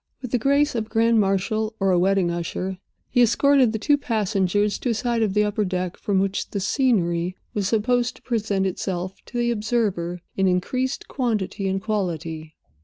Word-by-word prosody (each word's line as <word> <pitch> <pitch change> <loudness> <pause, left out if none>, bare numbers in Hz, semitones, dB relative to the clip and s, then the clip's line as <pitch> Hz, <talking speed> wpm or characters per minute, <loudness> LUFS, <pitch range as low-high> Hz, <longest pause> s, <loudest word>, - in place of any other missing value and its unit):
With 250 -3 -7
the 245 - +2
grace 280 +4 +2
of 225 -3 -2
a - - -27
grand 230 0 +3
marshal 215 +3 0
or 195 -1 +2
a 180 - +3
wedding 190 -1 +2
usher, 180 +2 -3 0.3
he 245 - +4
escorted 260 +1 +4
the 220 - -2
two 285 +6 +2
passengers 205 -4 0
to 250 - -2
a - - +2
side 235 0 0
of 210 -3 0
the 210 - +4
upper 210 0 0
deck, 180 -2 -2
from 200 -2 -1
which 195 +1 0
the 200 - -3
scenery 185 - +1 0.2
was 200 -3 0
supposed 240 +3 +1
to - - -19
present 210 -5 0
itself 185 0 -3
to 245 - -6
the 240 0 +1
observer 210 -6 -1
in 195 0 +2
increased 255 +9 -1
quantity 215 -6 -2
and 190 0 -1
quality. 165 -7 -3
210 Hz, 185 wpm, -23 LUFS, 185-235 Hz, 0.3 s, he